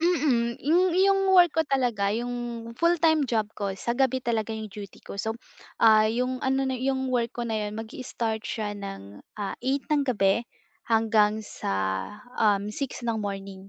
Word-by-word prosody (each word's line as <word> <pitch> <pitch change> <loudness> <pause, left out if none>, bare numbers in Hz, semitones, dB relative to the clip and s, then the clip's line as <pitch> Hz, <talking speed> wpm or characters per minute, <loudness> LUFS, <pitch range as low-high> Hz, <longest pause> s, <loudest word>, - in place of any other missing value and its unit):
Mm. 285 -9 +2
yu 305 +5 +3 0.3
yung 390 -1 +3
work 350 -2 +6
ko 320 - +5
talaga 245 -8 +1
yung 240 -1 -4
full-time 325 -3 +3
job 220 -3 0
ko 200 -2 -2
sa 235 +5 -3
gabi 260 -1 +2
talaga 225 -2 -1
iyong 220 -1 -6
duty 200 -1 -10
ko 200 - -9
so 220 +2 -1 0.5
ah 215 -1 +7
iyong 250 +3 -1
ano 265 +1 0
na 260 -2 -1
ayung 265 0 -1
work 240 -2 0
ko 240 - -3
na 225 -2 -1
iyon 210 0 -3
mag-istart 225 0 -4
siya 210 -2 -3
ng 195 - -8 0.4
8 270 +2 -1
ng 290 -2 +2
gabi 230 -1 +2 0.4
hanggang 220 -1 +3
sa 210 - -5 0.7
um, 205 -1 +2
6 265 +1 -5
ng 230 -2 0
morning, 195 -1 -6
235 Hz, 165 wpm, -26 LUFS, 215-265 Hz, 0.7 s, ah